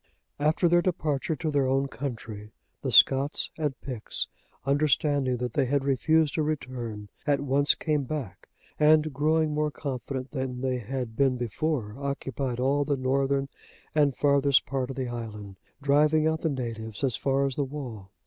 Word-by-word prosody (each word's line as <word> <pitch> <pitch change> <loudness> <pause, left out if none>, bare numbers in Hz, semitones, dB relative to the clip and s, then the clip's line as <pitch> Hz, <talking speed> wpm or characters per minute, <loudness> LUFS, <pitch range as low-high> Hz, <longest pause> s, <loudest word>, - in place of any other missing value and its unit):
After 155 +4 +3
their 175 +1 +4
departure 160 -4 -1
to 155 +1 -2
their 140 -2 +2
own 135 +1 +1
country, 115 -6 -6 0.3
the - - -2
Scots 135 +2 +5
and 150 -5 -2
Picts, 125 -6 -4 0.4
understanding 140 -2 +2
that 120 -1 -3
they 140 - +2
had 140 +1 +1
refused 155 +3 +2
to 160 - 0
return, 125 -8 -4 0.2
at 145 -1 +3
once 140 +1 +3
came 150 -3 -1
back, 125 -10 -6 0.3
and 155 0 +4
growing 155 +2 +2
more 150 0 +1
confident 135 -2 -5
than 130 -3 -3
they 130 -1 0
had 125 -1 -4
been 135 -1 +2
before, 120 -1 -2
occupied 135 -2 -3
all 140 +3 +2
the 140 -1 0
northern 135 +1 +1 0.5
and 145 -4 +2
farthest 140 -1 +4
part 135 -2 -2
of 135 - -5
the 130 -2 -2
island, 105 -5 -7 0.3
driving 150 +2 +4
out 160 0 +1
the 160 - +1
natives, 115 -4 -4
as 130 -3 +2
far 135 0 +1
as 135 -2 -2
the 145 - 0
wall. 130 -8 -7
135 Hz, 165 wpm, -27 LUFS, 125-150 Hz, 0.5 s, Scots